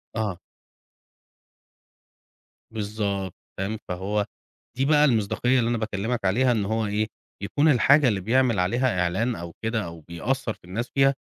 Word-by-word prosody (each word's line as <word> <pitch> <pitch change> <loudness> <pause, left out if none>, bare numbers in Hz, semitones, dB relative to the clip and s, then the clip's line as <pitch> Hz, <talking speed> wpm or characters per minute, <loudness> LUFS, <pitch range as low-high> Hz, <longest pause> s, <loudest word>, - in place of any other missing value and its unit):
آه. 105 -6 -2 2.3
بالضبط، 100 -3 -2 0.3
تمام، 100 +3 -2
فهو 100 +3 -1 0.5
دي 135 - +2
بقى 150 0 +5
المصداقية 120 +1 +2
اللي 115 -1 +1
أنا 120 - +1
باكلمك 110 +1 -2
عليها 125 +7 +3
إن 110 -4 +1
هو 110 +2 0
إيه؟ 105 +1 0 0.4
يكون 145 +9 +2
الحاجة 140 +2 +5
اللي 105 -5 +1
بيعمل 120 +1 +2
عليها 115 +3 +1
إعلان 105 +8 0
أو 85 -2 -7
كده، 110 -1 -1
أو 85 -1 -9
بيأثر 110 - -2
في - - -26
الناس 110 +7 -4
فيها، 135 0 +5
110 Hz, 145 wpm, -25 LUFS, 100-125 Hz, 2.3 s, بقى